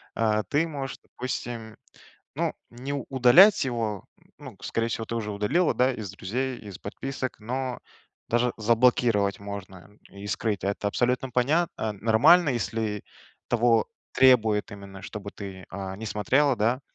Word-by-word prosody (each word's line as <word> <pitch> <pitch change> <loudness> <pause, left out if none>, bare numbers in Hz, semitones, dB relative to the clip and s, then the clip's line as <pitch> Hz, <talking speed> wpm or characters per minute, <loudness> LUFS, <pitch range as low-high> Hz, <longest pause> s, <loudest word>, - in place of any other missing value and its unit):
э, 110 -1 +1
ты 155 +3 +2
можешь, 140 -4 -5
допустим, 120 -3 -6 0.6
ну, - - -1 0.2
не 125 +4 -6
у 140 -3 -3
удалять 140 - +6
его. 115 -6 -2
Н - - -28 0.2
ну, - - -21
скорее 115 0 -1
всего, 115 0 -3
ты 115 - -4
уже 105 -2 -3
удалила, 135 - +1
да, 130 +1 +3
из 105 -5 -6
друзей, 125 +7 -3
из 100 -3 -9
подписок, 130 +5 -5
но 125 +3 -3 0.5
даже 120 +1 +2
заблокировать 115 -2 +3
можно 100 -2 -7
н 105 +1 -21 0.2
и 100 +1 -8
скрыть. 105 -1 -2
Это 100 +1 -1
абсолютно 125 +4 0
понятно, 125 -3 0
нормально, 115 - +5
если 110 -4 -2 0.5
того 115 -1 +3 0.3
требуют 115 -5 +4
именно, 100 -1 -10
чтобы 100 -1 -7
ты, 95 -2 -9
э, 95 0 -5
не 110 +3 -7
смотрела, 135 +7 +2
да, 120 +5 +1
115 Hz, 150 wpm, -26 LUFS, 105-130 Hz, 0.6 s, удалять